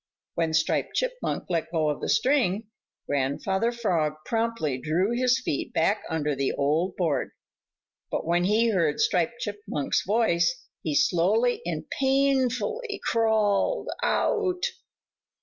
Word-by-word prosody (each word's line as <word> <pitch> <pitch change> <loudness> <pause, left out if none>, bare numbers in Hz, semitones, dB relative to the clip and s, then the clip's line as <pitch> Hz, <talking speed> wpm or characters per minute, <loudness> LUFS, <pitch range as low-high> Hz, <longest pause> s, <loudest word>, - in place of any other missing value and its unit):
When 165 -1 0
Striped 160 - 0
Chipmunk - - -2
let 165 -2 -1
go 160 -3 +1
of 150 - -3
the - - -3
string, 225 -6 +2 0.4
Grandfather 145 - 0
Frog 175 -11 0
promptly 225 - -1
drew 170 - 0
his 250 +1 +2
feet 200 - -3
back 200 +6 +2
under 150 -3 -1
the 135 0 -1
old 155 +6 0
board, 160 -7 0 0.8
but - - -2
when 175 +2 +2
he 220 +4 +3
heard 165 -7 +1
Striped 180 +7 +1
Chipmunk's 205 -9 -2
voice, 170 -6 +1 0.2
he 155 -2 -2
slowly 210 +11 +2
and 160 -2 -3
painfully 275 - 0
crawled 220 - +1
out. 375 -6 0
195 Hz, 125 wpm, -26 LUFS, 160-240 Hz, 0.8 s, he